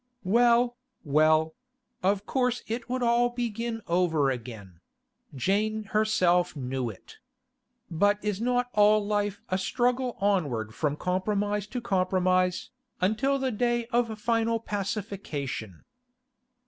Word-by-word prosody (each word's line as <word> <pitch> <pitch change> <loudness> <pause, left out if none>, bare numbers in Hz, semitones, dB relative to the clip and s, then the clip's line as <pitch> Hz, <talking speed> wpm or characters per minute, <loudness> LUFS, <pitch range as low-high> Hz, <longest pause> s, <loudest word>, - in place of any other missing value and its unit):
Well, 240 +4 +3 0.3
well; 155 +1 +3 0.5
of 195 +2 +1
course 250 -2 0
it 230 +2 -5
would 255 0 -1
all 240 +1 +3
begin 235 -1 -3
over 165 -5 +2
again; 110 -8 -8 0.6
Jane 210 - 0
herself 195 -5 +2
knew 130 -2 -3
it. 105 - -13 0.7
But 205 +5 +3
is 210 0 -1
not 245 0 0
all 210 0 +4
life 205 -1 -1
a 185 0 0
struggle 245 +4 0
onward 145 - 0
from 150 +2 -1
compromise 205 +4 -1
to 245 +3 -5
compromise, 185 +1 +1 0.3
until 220 +9 +1
the 265 -1 -1
day 240 +1 0
of 235 -2 +1
final 230 0 +1
pacification? 190 - -4
205 Hz, 115 wpm, -27 LUFS, 175-235 Hz, 0.7 s, all